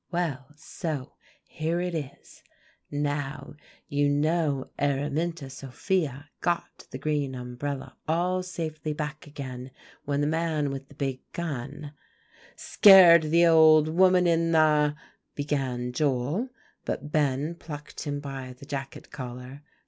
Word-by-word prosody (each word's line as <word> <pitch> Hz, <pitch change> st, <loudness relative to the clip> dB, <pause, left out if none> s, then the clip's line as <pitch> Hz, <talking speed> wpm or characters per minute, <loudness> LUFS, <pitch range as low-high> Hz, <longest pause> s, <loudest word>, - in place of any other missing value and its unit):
"Well, 155 Hz, -7 st, -2 dB
so 155 Hz, -3 st, -5 dB, 0.3 s
here 160 Hz, +2 st, -2 dB
it 180 Hz, 0 st, -2 dB
is. 145 Hz, -5 st, -7 dB, 0.5 s
Now, 145 Hz, -1 st, -3 dB, 0.3 s
you 145 Hz, -1 st, +1 dB
know 145 Hz, -1 st, 0 dB
Araminta 145 Hz, +3 st, -1 dB
Sophia 140 Hz, +2 st, -3 dB
got 175 Hz, -1 st, -2 dB
the -, -, -6 dB
green 145 Hz, -1 st, -1 dB
umbrella 125 Hz, +3 st, -5 dB
all 180 Hz, +3 st, +1 dB
safely 160 Hz, -4 st, -4 dB
back 150 Hz, 0 st, -5 dB
again 130 Hz, -3 st, -7 dB, 0.4 s
when 140 Hz, 0 st, -1 dB
the -, -, +2 dB
man 155 Hz, -2 st, 0 dB
with 135 Hz, 0 st, -7 dB
the 140 Hz, -, -16 dB
big 135 Hz, -2 st, -3 dB
gun" 145 Hz, -2 st, -5 dB, 0.6 s
"Scared 175 Hz, -6 st, +7 dB
the 170 Hz, +2 st, +5 dB
old 155 Hz, -2 st, +6 dB
woman 180 Hz, +2 st, +4 dB
in 165 Hz, -1 st, +2 dB
the" 150 Hz, -2 st, +4 dB, 0.4 s
began 135 Hz, -4 st, -2 dB
Joel, 145 Hz, -, 0 dB, 0.3 s
but 150 Hz, -, -4 dB
Ben 145 Hz, +1 st, +1 dB
plucked 150 Hz, -3 st, -9 dB
him 145 Hz, -1 st, -2 dB
by 135 Hz, -3 st, -7 dB
the 125 Hz, +2 st, -14 dB
jacket 135 Hz, -1 st, -6 dB
collar. 125 Hz, +1 st, -8 dB
145 Hz, 125 wpm, -27 LUFS, 135-165 Hz, 0.6 s, Scared